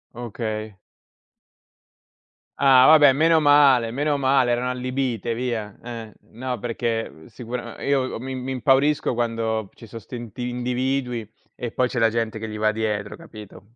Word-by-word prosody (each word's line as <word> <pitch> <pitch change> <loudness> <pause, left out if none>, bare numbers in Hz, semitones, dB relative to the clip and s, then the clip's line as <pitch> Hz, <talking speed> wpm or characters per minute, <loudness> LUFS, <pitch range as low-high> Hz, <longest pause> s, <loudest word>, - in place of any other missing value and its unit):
Okay. 110 -2 -5 1.8
Ah 130 -2 +6
vabbè 150 -3 +7
meno 160 +3 +4
male, 145 -5 +5
meno 145 +3 0
male, 130 -2 +2
erano 120 +1 0
allibite 125 -2 -2
via, 115 -4 -3
eh, 115 -2 -8 0.2
no 125 0 -4
perché, 115 0 -2
uhm, 80 - -17
sicura 120 -1 -7
ehm, - - -6
io 140 -1 +3
o - - -5
mi 130 +2 -5
mi 130 +1 -5
impaurisco 135 +2 +2
quando 115 -3 -2
ci 115 - -14
so' 115 - -9
st'inti 120 0 -7
individui 125 -1 -2 0.3
e 120 - -5
poi 125 +2 +1
c'è 125 - -6
la 115 0 +4
gente 115 -1 -2
che 110 - -5
gli 110 - -6
va 110 0 +2
dietro, 105 -2 -3
capito? 110 - -14
120 Hz, 155 wpm, -23 LUFS, 115-130 Hz, 1.8 s, vabbè